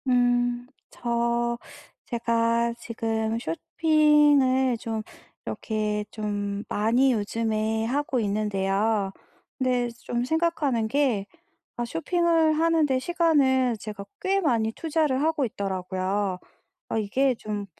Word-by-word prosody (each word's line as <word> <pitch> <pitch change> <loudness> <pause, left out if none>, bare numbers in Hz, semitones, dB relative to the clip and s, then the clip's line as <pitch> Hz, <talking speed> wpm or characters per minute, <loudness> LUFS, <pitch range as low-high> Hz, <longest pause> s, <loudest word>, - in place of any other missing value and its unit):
음 245 -1 +2 0.3
저 235 0 0 0.5
제가 235 0 +1
지금 225 -1 -2
쇼핑을 290 - +3
좀 225 -2 -4 0.4
이렇게 210 -1 -2
좀 205 -1 -3
많이 240 +5 +2
요즘에 220 0 -1
하고 270 +1 0
있는데요. 205 -1 0 0.5
근데 250 -2 +1 0.2
좀 240 0 -2
생각하는 300 -6 0
게 245 -5 +1 0.5
아 240 - -1
쇼핑을 330 +3 +2
하는 325 0 +3
데 265 -2 +1
시간을 265 -6 +2
제가 205 -2 -7
꽤 390 +1 +1
많이 230 -9 +1
투자를 305 -4 0
하고 310 -3 +1
있더라고요. 190 -2 -2 0.5
'아 - - -1
이게 255 +6 +1
좀 210 -2 -5
235 Hz, 210 characters per minute, -26 LUFS, 215-275 Hz, 0.5 s, 쇼핑을